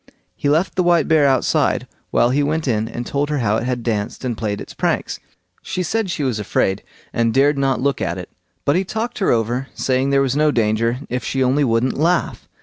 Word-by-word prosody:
He 145 - -1
left 160 +6 +2
the - - +4
white 175 -4 +3
bear 155 -3 +4
outside 130 -2 +1 0.2
while 120 - +3
he 140 +3 +2
went 155 +1 -1
in 110 -2 0
and 120 +1 -5
told 145 +3 -1
her 150 - 0
how 110 -4 +1
it 115 - -3
had 125 -2 -2
danced 110 +1 -2
and 120 -2 -1
played 105 -2 -3
its - - -9
pranks. - - -1 0.4
She 180 - -3
said 220 +3 -1
she 160 -4 -2
was 125 -5 -1
afraid, 95 -1 0 0.3
and 115 -1 +1
dared 140 +4 +3
not 135 -2 +1
look 140 -5 0
at 90 -1 -1
it; 90 -1 -8 0.3
but 140 - +3
he 185 - +2
talked 220 +5 -4
her 195 - +1
over, 120 +3 0
saying 130 +1 0
there 140 0 +3
was 135 -1 0
no 150 +1 +3
danger, 115 0 +1
if 125 0 -3
she 135 -1 0
only 135 +3 +2
wouldn't 120 0 +1
laugh. 170 +3 0
130 Hz, 225 wpm, -20 LUFS, 115-150 Hz, 0.4 s, the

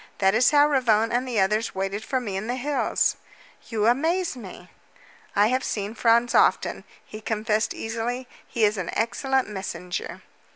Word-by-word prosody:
That 195 -1 +3
is 245 +3 +5
why 290 -1 +6
Ravone 235 -6 +2
and 250 +2 0
the 235 -4 0
others 210 +3 +1
waited 195 +2 -3
for 260 - -1
me 210 -6 -5
in 195 +3 -3
the 245 - -1
hills." 280 +3 0 0.5
"You 215 -2 0
amaze 320 +8 +1
me!" 190 -6 -11 0.6
"I 205 +2 +4
have 255 +1 0
seen 205 0 -3
Franz 235 +1 +3
often," - - +2 0.2
he 215 - -10
confessed 215 0 -1
easily. 235 +3 -4 0.2
"He 230 - -1
is 210 -1 +3
an 180 - -4
excellent 265 +3 0
messenger." 190 -3 -5
225 Hz, 165 wpm, -25 LUFS, 210-250 Hz, 0.6 s, why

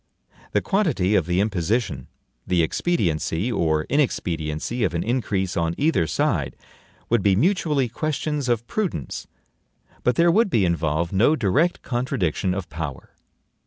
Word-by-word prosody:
The - - +2
quantity 155 - +1
of 90 -6 +2
the 90 +1 +1
imposition, 100 - -1 0.4
the 90 -2 +3
expediency 85 - 0
or 80 -7 +1
inexpediency 90 - -1
of 85 -5 0
an 85 - 0
increase 105 -6 -1
on 85 0 0
either 145 - +2
side, - - 0 0.5
would 120 -2 +3
be 95 -1 +3
mutually 150 - +2
questions 150 +1 -2
of 120 -1 +1
prudence; 175 - -3 0.7
but 125 - +2
there 170 0 +4
would 215 +4 +3
be 110 - +2
involved 85 0 0
no 115 +11 +4
direct 140 - +1
contradiction 95 - -1
of 95 -2 -4
power. 75 -4 -6
100 Hz, 135 wpm, -23 LUFS, 85-140 Hz, 0.7 s, there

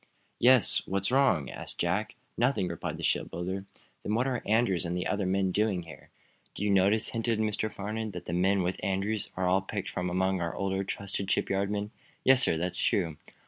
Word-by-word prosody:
"Yes; 125 -1 +5
what's 100 +3 -1
wrong?" 125 - +3
asked - - -8
Jack. - - -1 0.2
"Nothing," 120 -6 +1
replied 85 -2 -4
the - - -8
shipbuilder. 95 +3 -1 0.4
"Then 105 - -1
what 120 +3 +2
are 130 -3 -1
Andrews 105 -5 +2
and 90 0 -2
the 90 - -2
other 100 -2 0
men 95 0 +1
doing 100 -3 +1
here?" 85 - -13 0.5
"Do - - -4
you 105 - +2
notice," 100 +3 +4
hinted 115 -1 -1
Mr. 110 0 -1
Farnum, 110 +2 -4
"that 90 -3 -7
the 85 - -4
men 95 +2 +2
with 90 +1 -3
Andrews 100 +2 -1
are 95 -1 +1
all 95 +2 +3
picked 95 -1 -4
from 90 0 -2
among 95 +1 +1
our 85 -1 -2
older, 95 0 -1
trusted 100 0 -4
shipyard 100 0 +1
men." 105 0 -2 0.3
"Yes, 130 0 +6
sir. 80 - +3
That's 90 +2 -2
true." 80 -3 +1
100 Hz, 195 wpm, -29 LUFS, 90-110 Hz, 0.5 s, Yes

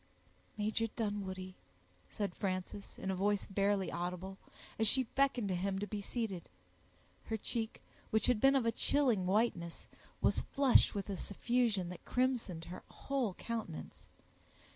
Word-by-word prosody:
"Major 215 +2 0
Dunwoodie," 195 -4 -3 0.6
said 200 -4 -3
Frances, 185 +1 -4
in 190 - -2
a - - -1
voice 205 +2 +1
barely 200 0 +1
audible, 180 +2 -4 0.4
as 220 - +5
she 260 +4 +8
beckoned 255 -3 +1
to 185 - +1
him 190 +2 -1
to 200 - -2
be 210 0 -4
seated; 200 -5 -3 0.8
her 220 - -2
cheek, 220 +1 -3 0.3
which 220 - +2
had 245 -4 +3
been 270 +1 +6
of 260 -3 +3
a 230 - +3
chilling 235 -6 +2
whiteness, 185 -5 0 0.3
was - - +3
flushed 270 -5 +4
with 200 - -2
a 200 -2 -3
suffusion 220 -3 0
that 180 - -8
crimsoned 245 -10 0
her 180 - -7
whole 260 -9 -2
countenance. 225 -8 -6
205 Hz, 145 wpm, -35 LUFS, 185-230 Hz, 0.8 s, she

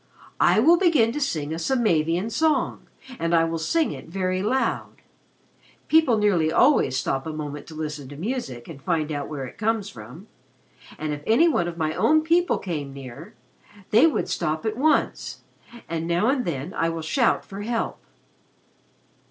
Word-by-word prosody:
"I - - +4
will 325 +9 +6
begin 310 -11 +3
to 295 - -4
sing 155 - -2
a 165 - -4
Samavian 175 -3 +1
song, 315 +6 0 0.3
and 165 +1 +1
I 165 - +4
will 165 0 -2
sing 320 - +1
it - - -8
very 185 +1 -1
loud. 255 +6 -1 0.9
People 310 -7 +4
nearly 185 -7 +2
always 145 - +3
stop 135 +3 -2
a - - -3
moment 150 -1 -6
to 160 - -10
listen 150 -3 -5
to 145 - -9
music 170 - -4
and 150 -5 -10
find 160 -2 -1
out 145 -1 -3
where 140 -3 -5
it 125 - -12
comes 220 -2 0
from. 125 - -11 0.7
And 155 -1 -3
if 145 - -6
any 235 +10 +5
of 175 - 0
my 155 -1 -1
own 310 - +3
people 345 +2 +2
came 150 -7 -4
near, 130 -3 -10 0.6
they 235 +9 +6
would 315 - -1
stop 155 0 -2
at 220 0 -1
once 305 +6 0 0.5
and 165 0 -3
now 175 +7 +2
and 265 -2 0
then 155 +1 -4
I 165 - 0
will 165 -1 -4
shout 235 - +1
for 195 +1 -8
help." 230 +2 -2
170 Hz, 170 wpm, -24 LUFS, 155-235 Hz, 0.9 s, will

